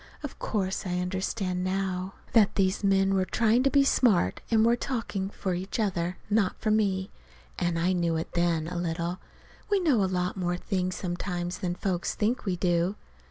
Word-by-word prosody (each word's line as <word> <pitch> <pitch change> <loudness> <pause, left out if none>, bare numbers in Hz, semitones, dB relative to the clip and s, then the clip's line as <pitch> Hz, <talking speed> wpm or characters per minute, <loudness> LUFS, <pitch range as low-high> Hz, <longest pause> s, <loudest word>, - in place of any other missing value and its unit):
Of 290 - -7
course 190 -2 -2
I 180 0 -1
understand 180 0 -2
now 185 0 -2 0.2
that 215 -4 +5
these 190 +1 +1
men 195 0 +3
were 190 -1 +2
trying 225 +5 +2
to 275 - +3
be 280 0 +4
smart, 210 - +3
and 225 -1 +4
were 235 +1 +4
talking 225 -6 -3
for 190 -2 -3
each 190 +5 -4
other, 180 -4 -1
not 205 -2 +2
for 215 - 0
me. 195 -3 +1 0.5
And 175 -2 0
I 175 +3 +2
knew 170 -2 +1
it 160 - -3
then 170 -2 +1
a 175 - -4
little. 170 +1 -2 0.5
We 405 -1 +3
know 285 - +3
a 190 - +1
lot 180 -1 -1
more 175 -1 -1
things 185 -1 -2
sometimes 175 0 -3
than 180 -3 -2
folks 180 -1 -2
think 225 +4 0
we 190 -3 0
do. 175 +1 +1
185 Hz, 185 wpm, -28 LUFS, 180-210 Hz, 0.5 s, that